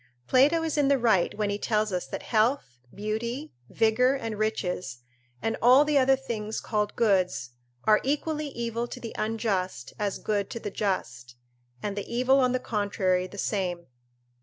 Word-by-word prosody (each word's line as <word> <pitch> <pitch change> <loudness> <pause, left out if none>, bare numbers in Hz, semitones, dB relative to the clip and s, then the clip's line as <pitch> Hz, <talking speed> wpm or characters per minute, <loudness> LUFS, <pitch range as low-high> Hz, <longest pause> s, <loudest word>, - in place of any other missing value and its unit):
Plato 295 - +4
is 315 -2 -1
in 285 - +3
the 280 0 +4
right 220 -8 +2
when 210 -1 0
he 205 - -2
tells 215 -2 0
us 180 -6 -2
that - - -6
health, 215 - 0
beauty, 235 +8 -4 0.2
vigour, 230 +4 +3
and 225 -6 -4
riches, 180 - -2 0.4
and 225 - 0
all 255 +5 +7
the 295 -1 +3
other 265 0 +5
things 220 -5 -4
called 210 -2 -2
goods, 180 - +1 0.3
are 215 -1 +4
equally 300 +2 -1
evil 235 -2 -3
to 250 - -8
the 230 -2 -7
unjust 200 - -2
as 205 -2 -1
good 205 -2 -1
to 230 - -5
the 205 - -5
just, 125 - -3 0.5
and 205 -1 -2
the 205 - -5
evil 255 +3 +3
on 255 -1 +3
the 255 - 0
contrary 195 -5 0
the 200 - -12
same. 180 -4 -2
215 Hz, 170 wpm, -27 LUFS, 195-250 Hz, 0.5 s, all